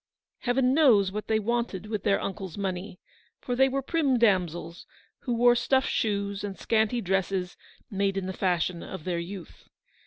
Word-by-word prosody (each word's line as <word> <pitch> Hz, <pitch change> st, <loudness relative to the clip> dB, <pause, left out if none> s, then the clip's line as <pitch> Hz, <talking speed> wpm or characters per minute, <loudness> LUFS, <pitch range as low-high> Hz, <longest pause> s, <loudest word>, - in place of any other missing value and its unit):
Heaven 255 Hz, +1 st, +2 dB
knows 230 Hz, -11 st, +5 dB
what 210 Hz, +2 st, -5 dB
they 220 Hz, -, +2 dB
wanted 230 Hz, -3 st, -2 dB
with 210 Hz, -2 st, -3 dB
their 200 Hz, -1 st, +2 dB
uncle's 190 Hz, -3 st, -5 dB
money, 185 Hz, -1 st, -4 dB, 0.4 s
for 245 Hz, -, -3 dB
they 265 Hz, +2 st, +4 dB
were 270 Hz, +1 st, -2 dB
prim 280 Hz, -4 st, +1 dB
damsels, 175 Hz, -6 st, 0 dB, 0.3 s
who 245 Hz, -3 st, -2 dB
wore 240 Hz, +1 st, +5 dB
stuff 265 Hz, +2 st, +2 dB
shoes 200 Hz, -2 st, -1 dB
and 200 Hz, -2 st, -5 dB
scanty 225 Hz, +1 st, +1 dB
dresses 190 Hz, -1 st, -1 dB, 0.4 s
made 195 Hz, -1 st, 0 dB
in 195 Hz, -, -2 dB
the 190 Hz, -, -4 dB
fashion 180 Hz, -2 st, 0 dB
of 190 Hz, -5 st, -8 dB
their 175 Hz, -1 st, -2 dB
youth. 180 Hz, +1 st, -9 dB
200 Hz, 165 wpm, -27 LUFS, 190-240 Hz, 0.4 s, knows